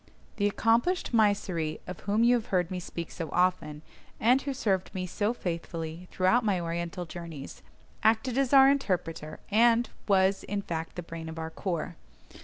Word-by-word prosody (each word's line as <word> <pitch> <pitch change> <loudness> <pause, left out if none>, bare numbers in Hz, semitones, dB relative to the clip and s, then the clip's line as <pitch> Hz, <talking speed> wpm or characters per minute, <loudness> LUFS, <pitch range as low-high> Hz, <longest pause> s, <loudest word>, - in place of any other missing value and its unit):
The 205 - +2
accomplished 235 - +1
Mysseri, 195 -8 +1
of 180 - -7
whom 210 +3 +1
you 240 +1 +6
have 235 -3 0
heard 180 -1 0
me 185 - -2
speak 170 -1 -6
so 165 -4 -5
often, 165 -4 0 0.4
and 250 +4 +4
who 280 - -3
served 195 -10 -1
me 185 -1 -2
so 205 +4 -1
faithfully 170 -4 -5
throughout 190 +7 +3
my 200 -4 +1
Oriental 170 +2 -3
journeys, 165 -4 -8 0.4
acted 225 +3 +2
as 270 -2 +1
our 270 -1 +8
interpreter, 180 - -1
and 235 +2 +4 0.2
was, 195 -1 +3
in 200 0 -3
fact, 165 -2 -4
the 175 - -5
brain 165 -1 -7
of 160 - -8
our 160 0 -4
corps. 170 -2 -3
185 Hz, 170 wpm, -29 LUFS, 170-225 Hz, 0.4 s, our